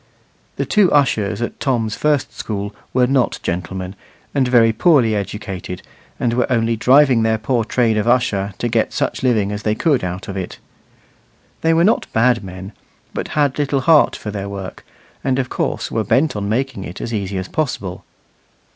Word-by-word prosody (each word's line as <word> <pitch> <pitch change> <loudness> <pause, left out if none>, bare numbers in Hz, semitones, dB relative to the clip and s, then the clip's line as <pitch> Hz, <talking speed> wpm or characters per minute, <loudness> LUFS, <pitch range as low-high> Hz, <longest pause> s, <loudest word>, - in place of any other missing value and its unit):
The - - -2
two 205 -5 +3
ushers 115 -6 +2
at - - -5
Tom's 115 -6 0
first 150 -3 0
school 100 -1 -4 0.2
were 125 -1 +3
not 130 -1 +1
gentlemen, 90 +2 -4 0.4
and 135 -3 +2
very 115 -2 +4
poorly 125 -4 +4
educated, 100 -3 -5 0.4
and 120 -1 0
were 125 +1 0
only 115 -1 +2
driving 130 +1 +5
their 110 0 +2
poor 115 +2 0
trade 115 -1 +1
of 105 +2 0
usher 105 -6 +1
to 120 - -1
get 115 -1 0
such - - -1
living 110 -6 +1
as 105 0 -4
they 105 0 0
could 145 - +1
out 90 +2 -4
of 100 - -5
it. 95 -2 -5 1.0
They 165 0 +3
were 165 - +4
not 215 +5 +2
bad 115 0 +3
men, 95 +2 -8 0.4
but - - -3
had 145 -1 +2
little 140 -2 +1
heart 155 +2 +5
for 105 - -6
their 100 -1 -5
work, 100 -2 -7 0.4
and 130 -1 +1
of 130 -2 -1
course - - -2
were 110 - 0
bent 135 +8 +2
on 100 -1 -3
making 120 -2 -1
it 90 - -8
as 115 - -4
easy 100 -2 -2
as 95 0 -3
possible. 120 -12 -3
115 Hz, 180 wpm, -19 LUFS, 100-130 Hz, 1.0 s, driving